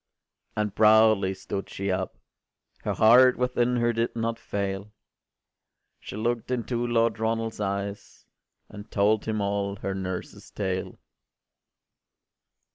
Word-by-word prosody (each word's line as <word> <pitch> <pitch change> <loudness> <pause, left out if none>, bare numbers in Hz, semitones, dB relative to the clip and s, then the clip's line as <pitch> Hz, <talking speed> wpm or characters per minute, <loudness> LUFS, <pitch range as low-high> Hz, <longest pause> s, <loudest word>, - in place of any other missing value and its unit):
” - - -42
O - - +2
and 105 -2 -3
proudly 110 -3 +5
stood 100 +1 -5
she 100 0 -3
up! 95 0 -3 0.7
Her - - 0
heart 125 +3 +6
within 125 -1 +1
her 120 0 +2
did 115 +1 -1
not 115 0 -2
fail: 100 0 -4 1.1
She - - -9
look’d 115 +2 -2
into 120 -1 -1
Lord 115 -2 +1
Ronald’s 115 0 -1
eyes, 100 0 -4 0.4
And 105 0 -11
told 105 +1 +2
him 110 -1 -1
all 100 0 -1
her 100 -1 -4
nurse’s 95 -1 -6
tale. 95 -2 -3
110 Hz, 125 wpm, -26 LUFS, 100-115 Hz, 1.1 s, heart